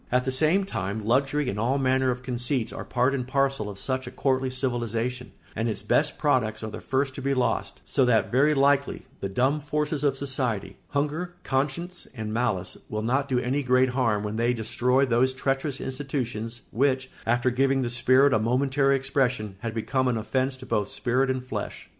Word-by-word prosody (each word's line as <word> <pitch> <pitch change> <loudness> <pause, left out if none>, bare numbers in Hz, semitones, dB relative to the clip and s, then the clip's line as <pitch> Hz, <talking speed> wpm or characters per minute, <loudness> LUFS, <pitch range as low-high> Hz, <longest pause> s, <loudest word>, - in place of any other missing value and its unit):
At 125 +1 +2
the 130 - 0
same 160 +9 +2
time 105 - -4
luxury 135 +4 +1
and 105 -4 -2
all 125 +5 +1
manner 130 -1 +2
of 125 0 -2
conceits 125 -1 -1
are - - -5
part 125 +2 +1
and 125 -3 -2
parcel 135 -5 0
of 100 - -8
such 130 +4 -2
a - - -6
courtly 130 -1 0
civilisation, 125 -1 -2 0.2
and 115 +2 0
its 105 -2 -4
best 150 +8 +1
products 115 -7 +1
are 110 - -4
the - - -7
first 135 0 0
to 135 - -7
be 140 +1 0
lost; 125 -3 -1
so 135 - +2
that 110 -3 +2
very 145 +5 +4
likely 140 0 +2 0.2
the 100 - -3
dumb 130 +9 +1
forces 150 0 -2
of 140 -2 +2
society—hunger, 140 - -2
conscience, 150 +7 -2
and 110 -2 -4
malice—will 110 -1 -2
not 135 +5 0
do 130 - +1
any 135 +4 0
great 130 0 +3
harm 115 -5 +1
when 105 +1 -3
they 120 +2 +2
destroy 125 +4 +2
those 130 +1 +2
treacherous 135 +1 -1
institutions 125 -4 -4
which, 130 0 +1 0.2
after 120 +2 +2
giving 135 +1 +2
the - - -1
spirit 130 +3 +4
a - - +3
momentary 135 +4 +2
expression, 130 -6 0
had 115 -1 -4
become 130 +3 0
an 120 -2 +1
offence 130 +4 -1
to - - -10
both 105 -1 0
spirit 130 +2 0
and 130 -1 -2
flesh. - - -5
130 Hz, 190 wpm, -26 LUFS, 120-135 Hz, 0.2 s, very